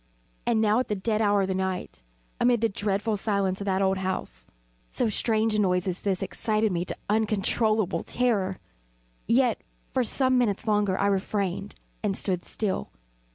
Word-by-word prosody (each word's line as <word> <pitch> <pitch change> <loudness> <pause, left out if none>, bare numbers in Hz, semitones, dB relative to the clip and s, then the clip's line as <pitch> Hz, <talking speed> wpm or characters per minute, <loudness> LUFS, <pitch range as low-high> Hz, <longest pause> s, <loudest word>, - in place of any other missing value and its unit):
And 235 -2 +3
now 215 +1 +3
at 255 - -1
the 210 - -1
dead 215 +2 0
hour 205 -2 +3
of - - -1
the 190 - 0
night, 190 -1 -3 0.4
amid 240 -2 +3
the 230 - +3
dreadful 205 +2 -1
silence 200 -2 0
of - - -3
that 195 0 +1
old 190 0 +2
house, - - -4 0.4
so 225 - 0
strange 220 0 +1
a 210 - +1
noise 180 -2 +2
as 180 0 -2
this 195 -3 0
excited 215 -1 0
me 175 -1 0
to - - -3
uncontrollable 215 -1 +1
terror. 205 -7 0 0.7
Yet, 245 -1 +3 0.3
for 260 - +2
some 255 +2 +2
minutes 220 -3 0
longer 205 -3 +2
I 200 - +1
refrained 200 0 -1 0.3
and 200 -3 0
stood 180 -3 -1
still. 205 -4 -2
205 Hz, 170 wpm, -27 LUFS, 190-220 Hz, 0.7 s, And